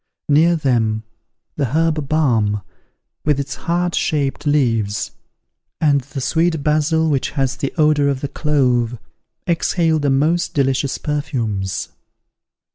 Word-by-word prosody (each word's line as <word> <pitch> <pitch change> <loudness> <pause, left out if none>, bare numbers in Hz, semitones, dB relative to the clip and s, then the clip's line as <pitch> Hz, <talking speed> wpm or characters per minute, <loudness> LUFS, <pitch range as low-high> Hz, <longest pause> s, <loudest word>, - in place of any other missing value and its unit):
Near 160 +4 +4
them, 115 -8 0 0.5
the 145 - +1
herb 160 -3 0
balm, 115 -10 +1 0.6
with 145 -2 +1
its 140 0 -3
heart 175 0 -1
shaped 145 -2 -1
leaves, 115 -8 +1 0.7
and 145 -3 +3
the 135 +1 -7
sweet 160 +1 +1
basil, 155 +2 +2
which 140 -4 0
has 135 -1 +1
the 140 - -2
odour 150 -2 +3
of 135 -2 -1
the 140 - -2
clove, 125 -6 +1 0.5
exhaled 165 -2 +1
the 145 - +1
most 155 +6 +1
delicious 135 -1 +1
perfumes. 115 -10 -2
145 Hz, 120 wpm, -19 LUFS, 130-155 Hz, 0.7 s, Near